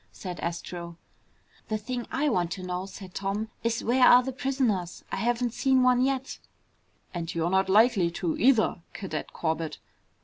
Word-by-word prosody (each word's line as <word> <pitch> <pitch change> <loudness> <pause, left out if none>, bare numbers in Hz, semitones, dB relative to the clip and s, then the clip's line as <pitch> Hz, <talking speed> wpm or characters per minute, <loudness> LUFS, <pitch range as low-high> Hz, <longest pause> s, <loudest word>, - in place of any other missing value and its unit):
said 180 -2 -7
Astro. 170 0 -5 0.7
"The 215 - -1
thing 240 +2 -5
I 295 +2 0
want 180 - +1
to 185 - -7
know," 180 +1 -3
said 190 -2 -10
Tom, 200 +3 -2
"is 230 -1 0
where 250 +2 +3
are 250 +1 +8
the 265 +1 -4
prisoners? 245 -10 -1
I - - -2
haven't 240 +2 0
seen 265 -1 +3
one 250 0 +4
yet." 270 0 -1 0.7
"And 170 -2 -4
you're 165 +1 0
not 190 0 +2
likely 210 -3 +5
to, 170 -1 -2
either, 225 -6 +3
Cadet 195 - -5
Corbett!" 160 -1 -2
205 Hz, 165 wpm, -27 LUFS, 180-250 Hz, 0.7 s, are